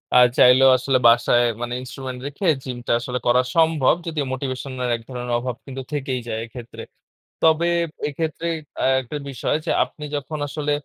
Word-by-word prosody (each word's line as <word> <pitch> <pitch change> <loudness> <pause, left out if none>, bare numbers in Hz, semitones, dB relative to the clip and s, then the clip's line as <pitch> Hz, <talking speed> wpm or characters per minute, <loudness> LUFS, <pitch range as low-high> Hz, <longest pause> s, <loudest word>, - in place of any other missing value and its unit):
আ - - +8 0.2
চাইলেও 130 +1 +7
আসলে 130 +1 +1
বাসায় 120 +1 +4 0.2
মানে 120 0 -3
instrument 130 0 -7
রেখে 145 +7 -6 0.2
জিম 125 -2 -5
টা - - +1
আসলে 125 +1 -3
করা 125 +1 +5
সম্ভব 160 -3 +4
যদি 160 -2 -3
মোটিভেশন 130 0 -4
এর 125 - -1
এক - - -15
ধরনের 125 -1 -4
অভাব 125 0 -4
কিন্তু 135 -1 -6
থেকেই 130 -3 -2
যায় 110 -1 -3
এক্ষেত্রে। 120 0 -10 0.6
তবে 160 +1 +4 0.4
এক্ষেত্রে 160 +2 -3 0.4
আ - - +3 0.2
একটা 130 +4 -6
বিষয় 130 0 -1
যে - - 0
আপনি 150 - -11
যখন 145 +2 -4
আসলে 145 0 -3
130 Hz, 170 wpm, -22 LUFS, 125-150 Hz, 0.6 s, আ